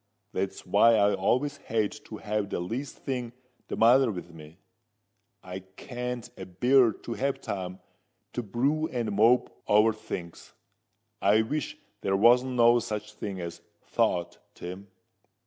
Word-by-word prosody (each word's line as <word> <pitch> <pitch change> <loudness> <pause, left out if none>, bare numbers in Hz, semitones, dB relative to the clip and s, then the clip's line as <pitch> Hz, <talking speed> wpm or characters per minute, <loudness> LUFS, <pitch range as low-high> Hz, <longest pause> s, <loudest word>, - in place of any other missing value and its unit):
That's 95 +1 -3
why 105 +5 +5
I 100 -1 +4
always 130 +9 +1
hate 110 -5 -2
to 110 - -8
have 105 -1 -2
the - - -2
least 115 +10 -4
thing 125 -3 -4 0.3
the - - -4
matter 125 +3 +6
with 90 -3 -8
me. 80 0 -13 0.9
I 95 +1 -6
can't 120 +6 -6
a 95 - -8
bear 120 +6 +4
to 115 - -7
have 135 +3 -1
time 95 -2 -5 0.5
to 120 - -2
brew 135 +9 0
and 120 -6 -2
mope 115 +5 +4 0.2
over 105 +2 +5
things. 85 -5 -8 0.7
I 105 +3 +4
wish 145 +5 -3 0.2
there 95 0 +1
wasn't 125 +4 +5
no 120 0 +5
such 105 -1 -5
thing 100 -3 -5
as 85 0 -7 0.2
thought, 85 -1 0 0.2
Tim." 95 +3 -8
110 Hz, 145 wpm, -28 LUFS, 95-125 Hz, 0.9 s, matter